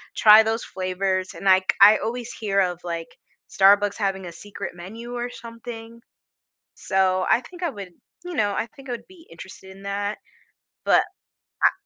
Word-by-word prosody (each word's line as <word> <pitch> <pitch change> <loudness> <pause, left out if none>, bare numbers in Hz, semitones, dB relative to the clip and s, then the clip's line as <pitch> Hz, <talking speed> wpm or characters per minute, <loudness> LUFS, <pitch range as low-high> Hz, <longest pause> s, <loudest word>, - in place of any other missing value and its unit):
try 215 0 +8
those 225 +1 -1
flavors, 185 0 -2
and, - - -9
like, 190 0 +4
I 210 +2 +9
always 240 +1 -4
hear 200 -3 0
of, 180 -2 -1
like, 170 -1 -5 0.4
Starbucks 200 +1 +4
having 195 -2 -2
a 175 - -7
secret 205 +3 -8
menu 225 +8 -9
or 240 0 -3
something, 230 -1 -10 0.8
so 185 -1 +1
I 240 - +4
think 355 +6 -13
I 345 - +1
would 200 -6 -9 0.3
you 355 - -6
know, 205 -6 +1
I - - -1
think 275 -1 -14
I 245 - -3
would 240 - -6
be 365 -3 -18
interested 190 +3 -12
in 195 - -15
that, 200 +1 -3 0.7
but - - +5 0.6
a - - +7
205 Hz, 170 wpm, -23 LUFS, 190-230 Hz, 0.8 s, I